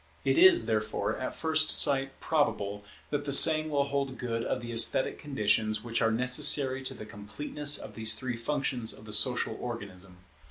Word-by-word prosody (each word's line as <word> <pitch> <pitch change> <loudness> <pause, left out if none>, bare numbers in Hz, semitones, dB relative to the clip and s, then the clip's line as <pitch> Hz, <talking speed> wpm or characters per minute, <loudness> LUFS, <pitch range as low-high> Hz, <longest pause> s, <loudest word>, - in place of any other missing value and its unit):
It - - +1
is, 370 0 +6
therefore, 110 -1 -3
at 130 - -6
first 160 -1 -1
sight 135 -1 +1
probable 105 -10 -2 0.3
that 145 -1 -3
the 140 - -4
same 155 +2 +6
will 145 -2 0
hold 140 -1 -4
good 115 -2 -4
of 125 - -3
the 120 -1 -9
esthetic 115 +3 +1
conditions 110 -5 -1
which 115 -1 -3
are 115 - +2
necessary 130 +3 +1
to - - -3
the 105 - -10
completeness 140 +8 +1
of - - -6
these 110 -1 +2
three 125 +1 -4
functions 125 -1 -3
of 105 - -14
the 105 - -9
social 125 +3 +2
organism. 95 -6 -9
125 Hz, 175 wpm, -28 LUFS, 110-145 Hz, 0.3 s, is